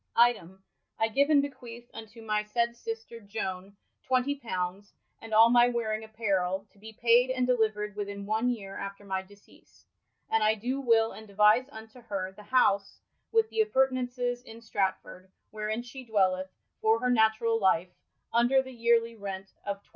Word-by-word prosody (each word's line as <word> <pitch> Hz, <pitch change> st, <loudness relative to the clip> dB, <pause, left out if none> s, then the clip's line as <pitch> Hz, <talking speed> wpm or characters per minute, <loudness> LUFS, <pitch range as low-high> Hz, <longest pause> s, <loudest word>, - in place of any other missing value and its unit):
Item, 190 Hz, -6 st, +2 dB, 0.3 s
I 225 Hz, -, +1 dB
gyve 280 Hz, +6 st, +2 dB
and 290 Hz, -2 st, +5 dB
bequeath 240 Hz, -4 st, -8 dB
unto 225 Hz, +1 st, -10 dB
my 215 Hz, -1 st, 0 dB
saied 235 Hz, +2 st, -1 dB
sister 450 Hz, -, -7 dB
Jone 200 Hz, -2 st, -6 dB, 0.3 s
xx.'* 230 Hz, -8 st, -1 dB, 0.3 s
and 225 Hz, -, -10 dB
all 225 Hz, +2 st, +7 dB
my 240 Hz, 0 st, +6 dB
wearing 225 Hz, -3 st, -1 dB
apparrell, 200 Hz, -3 st, -1 dB
to 200 Hz, -, -25 dB
be 220 Hz, +2 st, -10 dB
paied 235 Hz, +3 st, +4 dB
and 255 Hz, -1 st, 0 dB
delivered 215 Hz, -4 st, 0 dB
within 200 Hz, -1 st, -5 dB
one 220 Hz, +4 st, +1 dB
yeare 200 Hz, -5 st, -5 dB
after 200 Hz, +1 st, -7 dB
my 190 Hz, -1 st, -2 dB
deceas; 200 Hz, +2 st, -21 dB, 0.4 s
and 225 Hz, -, +1 dB
I 215 Hz, +1 st, +4 dB
doe 250 Hz, +6 st, -3 dB
will 225 Hz, -4 st, +3 dB
and 220 Hz, -, -11 dB
devise 210 Hz, +6 st, +4 dB
unto 220 Hz, +1 st, -12 dB
her 195 Hz, -4 st, -4 dB
the 190 Hz, -, -14 dB
house 205 Hz, -3 st, +1 dB, 0.3 s
with 450 Hz, -1 st, +2 dB
thappurtenaunces 255 Hz, -, 0 dB
in 225 Hz, -2 st, -12 dB
Stratford, 190 Hz, -3 st, -3 dB, 0.2 s
wherein 215 Hz, +2 st, -3 dB
she 260 Hz, +2 st, -10 dB
dwelleth, 190 Hz, -5 st, +1 dB, 0.3 s
for 220 Hz, +1 st, +3 dB
her 250 Hz, +1 st, +1 dB
naturall 225 Hz, 0 st, +3 dB
lief, 185 Hz, -3 st, +2 dB, 0.4 s
under 245 Hz, +3 st, +4 dB
the 260 Hz, 0 st, -10 dB
yearlie 230 Hz, -1 st, +2 dB
rent 195 Hz, -1 st, -6 dB
of 200 Hz, 0 st, -4 dB
xij.''' -, -, -32 dB
220 Hz, 160 wpm, -29 LUFS, 200-245 Hz, 0.4 s, all